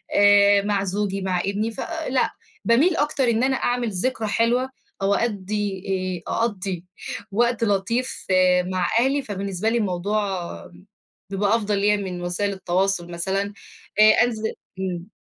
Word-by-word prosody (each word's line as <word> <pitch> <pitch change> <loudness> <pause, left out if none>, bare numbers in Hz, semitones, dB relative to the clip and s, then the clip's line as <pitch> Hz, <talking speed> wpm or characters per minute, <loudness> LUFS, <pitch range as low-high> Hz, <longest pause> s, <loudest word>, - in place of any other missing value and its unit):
آآ 205 0 +6
مع 200 -1 0
زوجي، 195 0 -2
مع 185 -1 0
ابني، 205 +4 -1
فـلأ، 310 -1 -1 0.3
باميل 290 +10 +4
أكتر 295 -2 +1
إن 230 +1 +2
أنا 265 0 +2
أعمل 245 -2 0
ذكرى 220 +3 -1
حلوة، 240 +4 +1 0.3
أو 195 +1 +2
أأدّي 205 -3 -2 0.4
آآ - - -3
أقضّي 195 -6 -2 0.5
وقت 235 +2 +1
لطيف 225 +5 0
آآ 180 -1 +4
مع 185 -1 -1
أهلي، 270 +3 +2
فبالنسبة 200 -2 -2
لي 235 - +1
الموضوع 205 0 0 1.1
بيبقى 200 +2 +1
أفضل 210 -2 0
ليّا 210 +1 +3
من 185 -3 -5
وسائل 200 +3 -1
التواصل 185 -1 0
مثلًا 195 +4 -2 0.5
آآ - - +9 0.2
أنزل 220 -2 -2 0.3
إمم. 180 +1 -4
205 Hz, 140 wpm, -23 LUFS, 190-230 Hz, 1.1 s, آآ